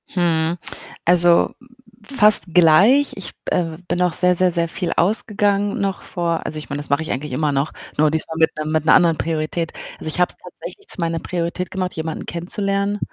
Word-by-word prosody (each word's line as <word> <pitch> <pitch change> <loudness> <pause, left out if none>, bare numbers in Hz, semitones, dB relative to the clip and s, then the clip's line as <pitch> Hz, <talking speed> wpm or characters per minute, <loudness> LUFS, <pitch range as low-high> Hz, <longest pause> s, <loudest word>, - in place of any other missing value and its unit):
Hm. 170 -2 0 0.5
Also, 175 0 +4 0.5
fast 210 -7 +5
gleich. 190 - +5
Ich, 195 - -8
b - - -5
äh, 165 -3 -2
b 180 - -20
bin 180 - -1
auch 180 -2 +1
sehr, 180 +2 +3
sehr, 185 +1 +3
sehr 170 -1 +1
viel 170 +1 -4
ausgegangen, 205 +1 +1
noch 195 -1 -2
vor 170 -2 -3
also, 155 - -2
ich 150 - -11
meine, 145 0 -4
das 145 - -5
mache 140 +2 +1
ich 160 - -6
eigentlich 145 +3 -4
immer 150 +3 0
noch, 140 +2 -1 0.3
nur 150 0 +3
diesmal 160 +1 -3
mit 160 0 +4
'nem 155 0 -3
mit 155 -1 0
'ner - - +5
anderen 165 -2 +3
Priorität. 165 +1 -2 0.3
Also, - - -4
ich 155 - -3
habe 180 - +3
es - - -3
tatsächlich 405 0 -11
zu - - -1
meiner 165 -1 -1
Priorität 175 +2 -4
gemacht, 185 -1 -3
jemanden 160 0 -5
kennenzulernen. 200 +3 -1
170 Hz, 205 wpm, -20 LUFS, 160-190 Hz, 0.5 s, fast